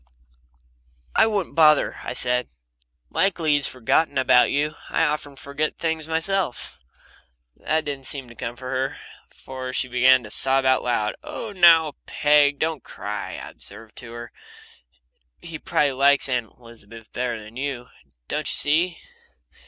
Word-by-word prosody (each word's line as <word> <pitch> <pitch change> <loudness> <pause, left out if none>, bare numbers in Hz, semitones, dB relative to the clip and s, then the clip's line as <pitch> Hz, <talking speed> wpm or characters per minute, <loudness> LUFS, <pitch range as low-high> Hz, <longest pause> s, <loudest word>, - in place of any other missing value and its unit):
"I - - +5
wouldn't 205 -4 -2
bother," 155 -2 +4
I - - -4
said. 125 0 +1 0.6
"Likely 170 -5 +1
he's 145 -1 +3
forgotten 135 +4 0
about 130 -1 +5
you. 150 +2 0 0.2
I - - +1
often 150 -2 -2
forget 140 +2 -3
things 160 -1 -2
myself." 165 -2 -2 0.8
That 155 0 -1
didn't 140 -2 -4
seem 135 -3 -3
to 120 - -13
comfort 120 +3 -6
her, 135 +2 -2 0.3
for 130 -1 -8
she 130 - -1
began 125 +1 +4
to 105 - -10
sob 135 +2 +2
out 130 0 +4
loud. 110 -3 -1
"Oh, 225 - -6
now. 165 -5 +5
Peg, 145 -1 +3
don't 160 -4 -2
cry," - - -6
I - - -8
observed 110 +2 -11
to 115 -1 -8
her. 120 0 -8 1.1
"He 165 -2 -8
probably 145 -2 +1
likes 140 +2 +3
Aunt 125 -4 -1
Elizabeth 115 -2 -14
better 120 -2 -2
than 105 +2 -13
you, 130 -2 -4 0.4
don't - - -2
you - - 0
see? 165 +4 +1
135 Hz, 145 wpm, -23 LUFS, 125-155 Hz, 1.1 s, I